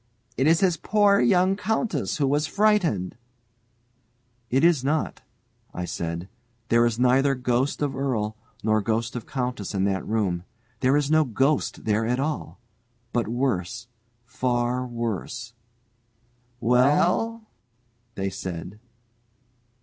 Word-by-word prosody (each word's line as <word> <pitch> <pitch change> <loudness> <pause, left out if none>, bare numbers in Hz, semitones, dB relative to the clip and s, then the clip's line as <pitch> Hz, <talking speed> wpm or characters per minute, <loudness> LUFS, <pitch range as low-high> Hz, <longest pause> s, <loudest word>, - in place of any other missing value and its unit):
"It 135 +4 +2
is 165 +1 +4
his 180 -4 +3
poor 205 +3 +3
young 180 +9 +3
countess 220 +2 -1
who 145 - +1
was 145 +2 +1
frightened 190 - +1 0.7
" 120 0 -42
"It 135 - +2
is 165 -6 +4
not," 150 +3 -1 0.5
I 90 - -3
said. 85 +1 -4 0.4
"There 115 0 +5
is 115 -1 -2
neither 130 +3 +3
ghost 125 +3 0
of 145 - -1
earl 115 -6 -1 0.3
nor 110 0 +2
ghost 115 +3 -1
of 120 - -6
countess 125 -6 -3
in 95 - +1
that 95 -1 0
room, 95 -6 0 0.4
there 130 +2 +3
is 145 0 0
no 155 0 +5
ghost 135 +3 0
there 110 +1 +1
at 125 +2 0
all; 150 +2 -3 0.5
but 120 -1 0
worse, 120 -2 -2 0.4
far 125 0 -1
worse 115 -1 -4 0.6
" 120 +1 -40
"Well?" 150 - +2 0.7
they 95 0 -2
said. 95 +1 -6
125 Hz, 130 wpm, -25 LUFS, 110-145 Hz, 0.7 s, There